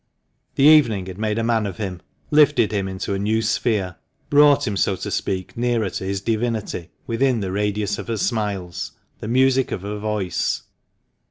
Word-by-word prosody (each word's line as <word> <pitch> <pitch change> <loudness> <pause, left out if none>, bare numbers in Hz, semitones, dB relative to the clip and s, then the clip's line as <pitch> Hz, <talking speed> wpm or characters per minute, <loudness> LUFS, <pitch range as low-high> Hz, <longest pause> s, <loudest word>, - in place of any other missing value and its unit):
The - - +2
evening 135 -11 +6
had 95 +1 -8
made 105 0 -1
a 115 - 0
man 115 -2 +1
of 95 - -6
him 95 -5 -5 0.2
— - - -43
lifted 145 -8 +4
him 100 -2 -1
into 95 +1 -4
a 95 - -2
new 110 +3 +1
sphere 105 -5 0 0.2
— - - -43
brought 145 -1 +6
him, 105 - -1
so 95 - +1
to - - -5
speak, 95 -1 -3
nearer 115 -4 0
to - - -5
his 95 0 -2
divinity, 110 -5 -2 0.2
within 125 +1 +1
the 95 -3 -3
radius 105 +1 -1
of - - -7
her 115 -1 -2
smiles, 100 -6 -2 0.3
the - - -6
music 130 +2 +3
of 95 - -4
her 105 +1 -4
voice. 105 -4 -1
105 Hz, 190 wpm, -22 LUFS, 95-115 Hz, 0.3 s, evening